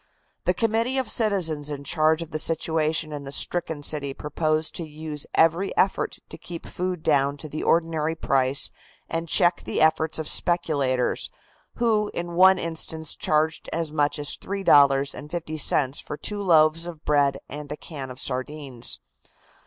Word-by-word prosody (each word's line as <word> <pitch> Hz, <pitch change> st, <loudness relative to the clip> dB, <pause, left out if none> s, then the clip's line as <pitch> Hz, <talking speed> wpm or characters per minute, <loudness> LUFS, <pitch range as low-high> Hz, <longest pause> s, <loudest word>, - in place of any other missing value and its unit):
The -, -, +2 dB
committee 230 Hz, +3 st, +1 dB
of 260 Hz, -5 st, 0 dB
citizens 170 Hz, -10 st, +1 dB
in 140 Hz, -1 st, -5 dB
charge 155 Hz, +2 st, +2 dB
of 165 Hz, -, -13 dB
the 155 Hz, -, -1 dB
situation 160 Hz, -1 st, +1 dB
in 145 Hz, -1 st, -6 dB
the 135 Hz, -, -8 dB
stricken 160 Hz, -1 st, 0 dB
city 140 Hz, -2 st, 0 dB
proposed 155 Hz, +1 st, -1 dB
to 170 Hz, -, -3 dB
use 155 Hz, -1 st, -6 dB
every 165 Hz, +4 st, +2 dB
effort 190 Hz, -, +1 dB
to -, -, -9 dB
keep 170 Hz, -2 st, -8 dB
food 180 Hz, -2 st, -4 dB
down 140 Hz, -2 st, +2 dB
to 155 Hz, -, -8 dB
the 155 Hz, +1 st, -5 dB
ordinary 165 Hz, -1 st, +1 dB
price 135 Hz, -3 st, +1 dB, 0.4 s
and 165 Hz, 0 st, -4 dB
check 175 Hz, -2 st, +5 dB
the -, -, -3 dB
efforts 160 Hz, 0 st, +2 dB
of 160 Hz, -1 st, -4 dB
speculators, 140 Hz, -8 st, 0 dB, 0.5 s
who 215 Hz, -3 st, +1 dB
in 175 Hz, 0 st, -4 dB
one 190 Hz, +2 st, +6 dB
instance 160 Hz, -2 st, -2 dB
charged 155 Hz, 0 st, 0 dB
as 165 Hz, -2 st, -2 dB
much 150 Hz, -1 st, +1 dB
as 145 Hz, 0 st, -3 dB
$3.50 145 Hz, -4 st, +1 dB
for 150 Hz, -, -7 dB
two 205 Hz, +4 st, -3 dB
loaves 165 Hz, -2 st, +3 dB
of 160 Hz, -3 st, -9 dB
bread 140 Hz, -2 st, +2 dB
and 145 Hz, 0 st, -8 dB
a 150 Hz, -, -4 dB
can 140 Hz, -5 st, -8 dB
of 125 Hz, 0 st, -8 dB
sardines. 130 Hz, -1 st, -2 dB
155 Hz, 155 wpm, -24 LUFS, 145-170 Hz, 0.5 s, one